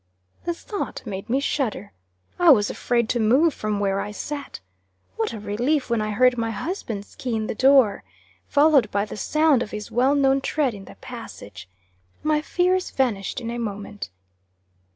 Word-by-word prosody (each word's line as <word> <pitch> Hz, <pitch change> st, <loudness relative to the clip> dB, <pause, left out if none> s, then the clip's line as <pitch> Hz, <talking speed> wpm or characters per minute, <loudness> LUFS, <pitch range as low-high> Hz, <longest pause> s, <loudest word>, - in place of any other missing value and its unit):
The 345 Hz, -, 0 dB
thought 410 Hz, +3 st, -5 dB
made 195 Hz, -2 st, -6 dB
me 260 Hz, +3 st, +2 dB
shudder. 245 Hz, -8 st, -2 dB, 0.5 s
I 350 Hz, -1 st, +6 dB
was 210 Hz, -8 st, +5 dB
afraid 235 Hz, -2 st, 0 dB
to 240 Hz, -, +1 dB
move 265 Hz, +9 st, +4 dB
from 215 Hz, -1 st, -2 dB
where 195 Hz, -1 st, 0 dB
I 205 Hz, -, -4 dB
sat. 285 Hz, -, -6 dB, 0.6 s
What 225 Hz, -, -1 dB
a 225 Hz, -, -6 dB
relief 245 Hz, +7 st, -1 dB
when 230 Hz, -2 st, +2 dB
I 215 Hz, -, -2 dB
heard 250 Hz, +3 st, +3 dB
my 230 Hz, 0 st, 0 dB
husband's 225 Hz, -, -5 dB
key 245 Hz, -3 st, -3 dB
in 220 Hz, -1 st, -1 dB
the -, -, -3 dB
door, 260 Hz, -3 st, +4 dB, 0.4 s
followed 285 Hz, -6 st, +4 dB
by 200 Hz, 0 st, 0 dB
the -, -, -8 dB
sound 305 Hz, +3 st, +2 dB
of 230 Hz, -, -3 dB
his 210 Hz, 0 st, -7 dB
well 260 Hz, +4 st, +3 dB
known 270 Hz, -1 st, +3 dB
tread 280 Hz, -3 st, 0 dB
in 195 Hz, -2 st, -10 dB
the -, -, -13 dB
passage! 225 Hz, -, -10 dB, 0.5 s
My 305 Hz, -1 st, +2 dB
fears 360 Hz, +3 st, +1 dB
vanished 220 Hz, -8 st, -1 dB
in 230 Hz, -1 st, -5 dB
a 240 Hz, -, -4 dB
moment. 205 Hz, -2 st, -5 dB
240 Hz, 175 wpm, -23 LUFS, 210-280 Hz, 0.6 s, I